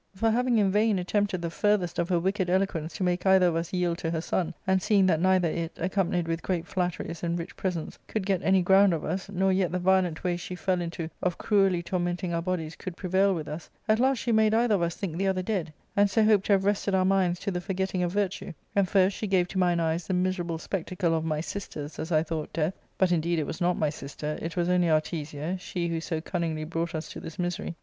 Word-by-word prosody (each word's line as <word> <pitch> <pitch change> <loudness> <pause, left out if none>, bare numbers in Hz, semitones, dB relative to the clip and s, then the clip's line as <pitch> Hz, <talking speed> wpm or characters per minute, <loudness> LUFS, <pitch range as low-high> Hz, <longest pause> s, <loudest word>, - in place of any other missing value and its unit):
For, 225 +4 +2
having 245 +1 +2
in 200 -3 +3
vain 210 0 +3
attempted 190 0 0
the 170 - -2
farthest 205 -2 +1
of 170 - 0
her 180 - +3
wicked 190 +1 0
eloquence 180 -4 0
to 195 - -2
make 180 0 0
either 190 -1 +5
of 175 -2 +2
us 165 +1 -2
yield 175 -2 0
to 165 - -2
her 165 -1 -1
son, 170 0 -2
and 190 0 +2
seeing 200 -1 +3
that 165 -4 +2
neither 185 -1 +3
it, 165 0 -3
accompanied 180 -1 0
with 165 0 -2
great 180 -3 -2
flatteries 175 -2 -3
and 170 0 -1
rich 175 +3 -6
presents, 180 -4 -3
could 215 -4 -2
get 190 -3 +1
any 190 -1 +3
ground 190 0 +5
of 155 - -5
us, 190 +5 -3
nor 190 0 +1
yet 185 -3 +1
the 180 - 0
violent 180 -2 +2
way 175 -1 0
she 180 +1 -6
fell 180 0 0
into 170 -1 -4
of 180 -2 0
cruelly 195 -4 +2
tormenting 175 0 -2
our 170 - 0
bodies 165 -3 -3
could 185 -3 -7
prevail 190 +1 +2
with 155 -3 -5
us, 155 +2 -7 0.2
at 215 0 +3
last 265 +1 +3
she 235 - -1
made 220 -1 +4
either 230 -1 +3
of 195 - +2
us 170 -1 0
think 170 -5 -4
the 195 +1 0
other 185 -1 0
dead, 185 -6 -2 0.2
and 205 0 +4
so 220 +2 +3
hoped 215 -3 +4
to 205 - +4
have 195 -1 +2
wrested 200 -1 +1
our 185 0 +3
minds 185 -2 +2
to 200 - -2
the 180 -1 -2
forgetting 190 0 -2
of 175 -1 0
virtue; 195 -1 -2 0.2
and 195 -2 +3
first 195 0 +3
she 215 - -3
gave 185 -2 +2
to 190 - -3
mine 175 -2 +3
eyes 165 0 -1
the 185 - 0
miserable 180 -2 -1
spectacle 180 0 -2
of 160 -1 0
my 155 -2 -1
sister's 155 -5 -6
(as 160 - -4
I 155 -1 +3
thought) 160 -1 -4
death; 165 +2 0 0.2
but, 185 -2 +3
indeed, 170 0 +1
it 155 - 0
was 160 - -6
not 175 0 +2
my 150 -2 +1
sister 150 +1 -5
— - - -15
it 165 +2 -5
was 175 0 +1
only 180 -1 +3
Artesia, 155 +1 -1
she 175 -1 -3
who 165 -1 -2
so 160 -1 -2
cunningly 165 -3 -2
brought 165 +1 -3
us 155 0 -4
to - - -7
this 160 - -9
misery. 175 -1 -3
180 Hz, 250 wpm, -27 LUFS, 170-190 Hz, 0.2 s, either